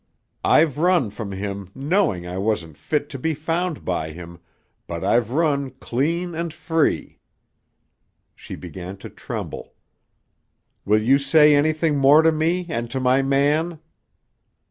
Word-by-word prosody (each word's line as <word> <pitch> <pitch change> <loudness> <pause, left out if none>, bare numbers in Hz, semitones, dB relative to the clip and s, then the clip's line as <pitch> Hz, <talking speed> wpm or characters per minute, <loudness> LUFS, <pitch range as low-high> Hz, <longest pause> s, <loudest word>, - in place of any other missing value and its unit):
I've 150 -3 +3
run 170 - +2
from 105 -1 -6
him 100 -1 -5
knowing 140 - 0
I 90 +1 -5
wasn't 95 -7 -2
fit 145 - -2
to 135 - -7
be 160 +4 -1
found 165 +2 -2
by 85 -3 -2
him, 85 0 -10 0.5
but 85 -1 -5
I've 115 -2 +2
run 140 -1 0
clean 170 +8 -1
and 165 0 -3
free." 160 0 -1 1.1
She - - -9
began 90 +2 -8
to - - -10
tremble. - - -7 1.1
"Will 105 +1 +3
you 135 +5 +4
say 150 +2 +5
anything 155 0 +2
more 145 +4 +6
to 160 - +5
me 165 +3 0
and 120 -8 -3
to 130 - -3
my 130 +1 +3
man?" 145 +5 +1
140 Hz, 140 wpm, -22 LUFS, 105-160 Hz, 1.1 s, more